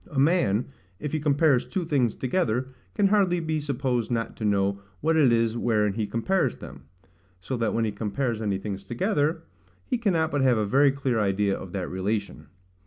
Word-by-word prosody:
A 150 - -7
man, 135 - +3 0.3
if 150 - -4
he 155 - -1
compares 145 -2 +3
two 185 -4 -3
things 135 -8 +1
together, 130 -3 -1 0.3
can 200 - +3
hardly 190 -4 +3
be 160 -2 -1
supposed 130 -4 -1
not 115 -2 -2
to - - -6
know 100 -1 +1 0.2
what 160 - +1
it 145 -6 +5
is 115 -1 +2
wherein 105 -4 +1
he 110 0 -2
compares 175 - 0
them: - - -11 0.5
so 110 +8 -4
that 115 -2 0
when 115 0 +1
he 110 - -1
compares 110 +3 -2
any 100 -3 0
things 100 0 -5
together, 155 - 0 0.4
he 250 - -1
cannot 165 -8 +1
but 145 - 0
have 130 -3 +4
a 105 - +1
very 135 +6 +4
clear 135 -4 -1
idea 100 -1 +1
of 95 - -8
that 95 -3 -3
relation. 95 -4 -3
120 Hz, 190 wpm, -26 LUFS, 105-150 Hz, 0.5 s, it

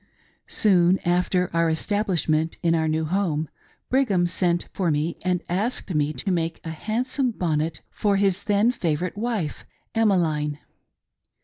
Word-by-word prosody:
Soon 185 -3 +4
after 180 +1 +1
our 165 0 +3
establishment 165 -3 0
in 165 -1 +3
our 160 -1 +1
new 160 0 0
home, 160 -3 0 0.4
Brigham 230 -10 +2
sent 175 0 0
for 185 -3 0
me 155 +2 -1
and 180 -1 0
asked 200 +2 -2
me 150 -1 +1
to 145 +7 -3
make 165 -2 -1
a 160 - -5
handsome 245 - -1
bonnet 160 -6 -1
for 205 -1 +1
his 195 -1 +1
then 210 +3 +3
favorite 175 -6 -2
wife 210 -8 -2 0.3
Emmeline. 165 -9 +1
175 Hz, 135 wpm, -24 LUFS, 160-205 Hz, 0.4 s, Soon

